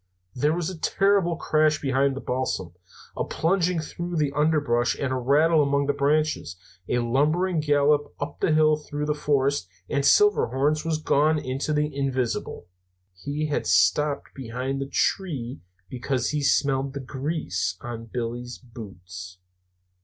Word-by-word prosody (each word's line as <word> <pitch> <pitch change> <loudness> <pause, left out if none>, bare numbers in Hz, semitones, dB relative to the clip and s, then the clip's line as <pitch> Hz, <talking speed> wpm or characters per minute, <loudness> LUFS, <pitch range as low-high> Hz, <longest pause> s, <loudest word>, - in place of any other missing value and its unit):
There 150 +5 +1
was 175 -2 -2
a 175 - -9
terrible 195 -1 +2
crash 155 -1 +2
behind 135 0 +1
the 135 - -5
balsam, 125 -9 -2 0.4
a - - -1
plunging 180 0 0
through 175 +2 -5
the 150 -3 +1
underbrush 145 -5 +1
and 135 -2 -1
a - - 0
rattling 150 +6 +3
among 140 0 +1
the 145 - +1
branches, 145 - 0 0.3
a 125 - +1
lumbering 155 +9 +1
gallop 145 0 +2
up 145 0 -5
the - - +1
hill 155 0 +4
through 150 0 -5
the 150 - +1
forest, 140 -6 0 0.2
and 140 +5 0
Silverhorns 150 - +3
was 165 -1 0
gone 155 0 +2
into 135 +1 -3
the 150 -1 0
invisible. 130 -8 -2 0.5
"He 145 +11 -4
had 145 - -1
stopped 140 +10 +2
behind 130 +2 -4
the 135 - -4
tree 140 -10 -1 0.3
because 125 +2 -2
he 150 -1 -1
smelled 135 -1 +1
the - - -3
grease 130 - -3
on 115 -1 -7
Billy's 120 +1 -5
boots. 90 -6 -10
140 Hz, 145 wpm, -25 LUFS, 125-155 Hz, 0.5 s, hill